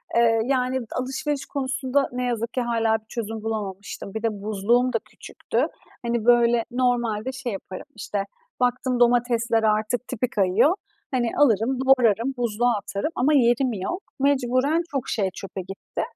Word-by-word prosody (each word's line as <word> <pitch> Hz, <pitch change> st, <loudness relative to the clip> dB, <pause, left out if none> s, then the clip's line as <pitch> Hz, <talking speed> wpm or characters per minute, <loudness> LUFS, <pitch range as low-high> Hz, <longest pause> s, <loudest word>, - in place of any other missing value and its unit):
Eee, 230 Hz, -1 st, +4 dB
d -, -, -6 dB
yani 260 Hz, -1 st, +1 dB
alışveriş 270 Hz, +3 st, -2 dB
konusunda 270 Hz, 0 st, -1 dB
ne 250 Hz, 0 st, -3 dB
yazık 235 Hz, -1 st, -2 dB
ki 255 Hz, -, 0 dB
hâlâ 225 Hz, -2 st, +1 dB
bir 215 Hz, -, -33 dB
çözüm 225 Hz, -1 st, -4 dB
bulamamıştım. 200 Hz, -3 st, -5 dB
Bir 220 Hz, +1 st, -4 dB
de 210 Hz, -3 st, -1 dB
buzluğum 235 Hz, +5 st, +2 dB
da 225 Hz, -, +2 dB
küçüktü. -, -, -3 dB, 0.4 s
Hani 235 Hz, -1 st, -1 dB
böyle 240 Hz, -1 st, +5 dB
normalde 245 Hz, -2 st, 0 dB
şey 260 Hz, -3 st, -4 dB
yaparım, 190 Hz, +2 st, -7 dB
işte 200 Hz, -1 st, -3 dB, 0.4 s
baktım 250 Hz, 0 st, +1 dB
domatesler 235 Hz, -1 st, +3 dB
artık 215 Hz, +3 st, +1 dB
tipi 250 Hz, 0 st, -2 dB
kayıyor. 210 Hz, -, +3 dB, 0.4 s
Hani 240 Hz, -3 st, +1 dB
alırım, 250 Hz, -1 st, +3 dB
doğrarım, 250 Hz, -1 st, +4 dB
buzluğa 240 Hz, 0 st, +1 dB
atarım 200 Hz, -, -3 dB
ama 290 Hz, +5 st, +2 dB
yerim 245 Hz, -1 st, +3 dB
yok. 345 Hz, -, -4 dB, 0.2 s
Mecburen 280 Hz, +3 st, +2 dB
çok 275 Hz, -3 st, -2 dB
şey 200 Hz, -3 st, 0 dB
çöpe 195 Hz, -1 st, -6 dB
gitti. 195 Hz, +2 st, -6 dB
240 Hz, 150 wpm, -24 LUFS, 220-255 Hz, 0.4 s, böyle